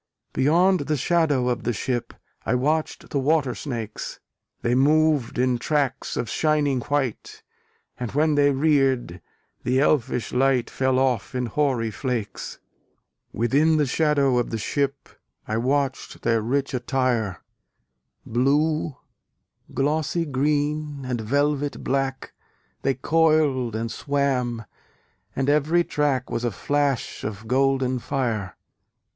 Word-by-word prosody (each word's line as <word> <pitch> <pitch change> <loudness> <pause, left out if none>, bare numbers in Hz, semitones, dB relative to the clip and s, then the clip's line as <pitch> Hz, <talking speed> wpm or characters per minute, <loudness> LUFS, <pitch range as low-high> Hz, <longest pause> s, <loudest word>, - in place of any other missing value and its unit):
Beyond 180 +7 +3
the 150 - +2
shadow 145 -4 +2
of 125 -2 0
the 120 - -1
ship, 120 +3 -3 0.3
I 120 - 0
watched 155 +5 -1
the 145 - +1
water 140 -2 +2
snakes: 115 -7 -5 0.4
They 120 - +1
moved 150 0 +3
in 125 -1 +1
tracks 140 -1 -1
of 120 - -1
shining 150 -3 +1
white, 135 -3 -3 0.6
And 125 -3 -3
when 150 +2 +3
they 145 -1 +4
reared, 135 - +1 0.4
the 130 +1 +1
elfish 130 -4 +1
light 130 -1 +2
Fell 130 -1 +1
off 130 -2 0
in 125 0 0
hoary 120 -2 0
flakes. 120 -3 -4 0.7
Within 145 +8 +2
the 150 - +3
shadow 140 -3 +2
of 120 - -1
the 115 - -2
ship 140 +5 -2 0.4
I 110 - -1
watched 135 +2 -1
their 115 -1 +2
rich 135 +5 -1
attire: 125 -6 -1 0.8
Blue, 145 +4 +1 0.7
glossy 155 +4 0
green, 145 0 -1
and 125 -3 -2
velvet 145 +4 0
black, 135 -1 -2 0.5
They 135 -1 +1
coiled 150 -5 +2
and 115 +1 -3
swam; 130 -5 -1 0.7
and 135 - -1
every 150 +4 +3
track 140 -5 -1
Was 120 - -2
a 120 - +1
flash 140 +4 -1
of 110 +1 -5
golden 130 0 +1
fire. 115 -8 -2
135 Hz, 125 wpm, -24 LUFS, 125-150 Hz, 0.8 s, they